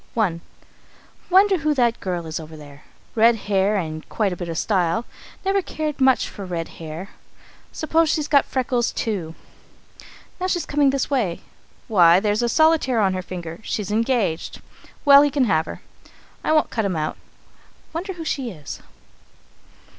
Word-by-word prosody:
I. 185 Hz, -7 st, +1 dB, 0.9 s
"Wonder 385 Hz, 0 st, +5 dB
who 305 Hz, 0 st, +1 dB
that 240 Hz, -3 st, +2 dB
girl 180 Hz, -3 st, -3 dB
is 160 Hz, 0 st, -4 dB
over 155 Hz, 0 st, -10 dB
there? 145 Hz, -1 st, -14 dB, 0.3 s
Red 230 Hz, +1 st, +5 dB
hair 200 Hz, -1 st, +1 dB
and 155 Hz, -3 st, -5 dB
quite 205 Hz, -4 st, 0 dB
a -, -, -4 dB
bit 175 Hz, -1 st, -6 dB
of 165 Hz, -, -4 dB
style. 190 Hz, +3 st, 0 dB, 0.4 s
Never 390 Hz, +1 st, +2 dB
cared 305 Hz, -4 st, -4 dB
much 260 Hz, -1 st, +4 dB
for 200 Hz, -, -9 dB
red 175 Hz, -3 st, -4 dB
hair 165 Hz, +4 st, -7 dB, 0.6 s
suppose 320 Hz, 0 st, +1 dB
she's 300 Hz, -1 st, 0 dB
got 285 Hz, -2 st, +4 dB
freckles 250 Hz, -2 st, 0 dB
too. 180 Hz, -8 st, -3 dB, 1.0 s
Now 365 Hz, -, -1 dB
she's 355 Hz, -2 st, -1 dB
coming 290 Hz, -1 st, +2 dB
this 275 Hz, +1 st, -1 dB
way. 220 Hz, -11 st, 0 dB, 0.5 s
Why, 175 Hz, -5 st, +6 dB
there's 210 Hz, +2 st, 0 dB
a 240 Hz, -, +1 dB
solitaire 315 Hz, -4 st, +3 dB
on 195 Hz, -3 st, +2 dB
her 185 Hz, -, -2 dB
finger; 175 Hz, -2 st, -7 dB
she's 210 Hz, -2 st, -3 dB
engaged. 220 Hz, -7 st, 0 dB, 0.5 s
Well, 280 Hz, -1 st, +9 dB
he 290 Hz, -, +3 dB
can 280 Hz, -2 st, +1 dB
have 160 Hz, -7 st, +1 dB
her -, -, -8 dB, 0.6 s
I -, -, 0 dB
won't 310 Hz, -1 st, +2 dB
cut 225 Hz, -, -1 dB
him 195 Hz, -3 st, -1 dB
out. 155 Hz, -1 st, -2 dB, 0.8 s
Wonder 365 Hz, +4 st, -4 dB
who 335 Hz, -2 st, -8 dB
she 270 Hz, -5 st, -2 dB
is! 150 Hz, -8 st, -9 dB
220 Hz, 165 wpm, -22 LUFS, 175-285 Hz, 1.0 s, Well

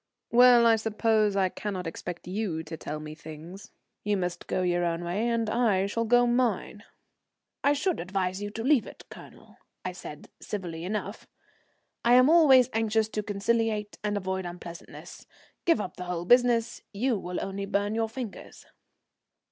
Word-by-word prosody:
"Well, 245 Hz, 0 st, +7 dB
I 225 Hz, -1 st, +5 dB
suppose 215 Hz, -1 st, +1 dB
I 190 Hz, -2 st, +2 dB
cannot 190 Hz, -2 st, -5 dB
expect 170 Hz, +1 st, -6 dB
you 180 Hz, -4 st, -3 dB
to 160 Hz, +1 st, -7 dB
tell 150 Hz, -1 st, -6 dB
me 155 Hz, 0 st, -8 dB
things. 160 Hz, +4 st, -11 dB, 0.3 s
You 210 Hz, -1 st, +1 dB
must 180 Hz, -2 st, -4 dB
go 185 Hz, -, -1 dB
your 175 Hz, -1 st, +1 dB
own 170 Hz, 0 st, -1 dB
way 190 Hz, +7 st, -1 dB
and 230 Hz, -1 st, 0 dB
I 215 Hz, -4 st, +2 dB
shall 230 Hz, +3 st, -1 dB
go 245 Hz, +2 st, +4 dB
mine." 240 Hz, -4 st, 0 dB, 0.8 s
"I 285 Hz, -, +4 dB
should 320 Hz, +5 st, -1 dB
advise 185 Hz, +1 st, -2 dB
you 205 Hz, -, -3 dB
to 225 Hz, +2 st, -6 dB
leave 270 Hz, -2 st, +3 dB
it, -, -, -12 dB
Colonel," -, -, -14 dB, 0.3 s
I 185 Hz, -, -2 dB
said, 150 Hz, -4 st, -10 dB
civilly 175 Hz, -5 st, -5 dB
enough. 205 Hz, +1 st, -4 dB, 0.8 s
"I'm 250 Hz, +4 st, +6 dB
always 270 Hz, -7 st, +7 dB
anxious 220 Hz, -1 st, +1 dB
to 215 Hz, -, -2 dB
conciliate 210 Hz, +1 st, -1 dB
and 205 Hz, -1 st, -1 dB
avoid 190 Hz, -1 st, -3 dB
unpleasantness. 175 Hz, -1 st, -10 dB, 0.4 s
Give 335 Hz, -9 st, +4 dB
up 185 Hz, -, -5 dB
the 180 Hz, -, -6 dB
whole 175 Hz, -1 st, -3 dB
business; 240 Hz, +1 st, +3 dB
you 225 Hz, +1 st, 0 dB
will 180 Hz, -1 st, -5 dB
only 195 Hz, 0 st, -4 dB
burn 205 Hz, +1 st, 0 dB
your 225 Hz, 0 st, 0 dB
fingers." 230 Hz, -3 st, -8 dB
205 Hz, 165 wpm, -27 LUFS, 180-230 Hz, 0.8 s, Well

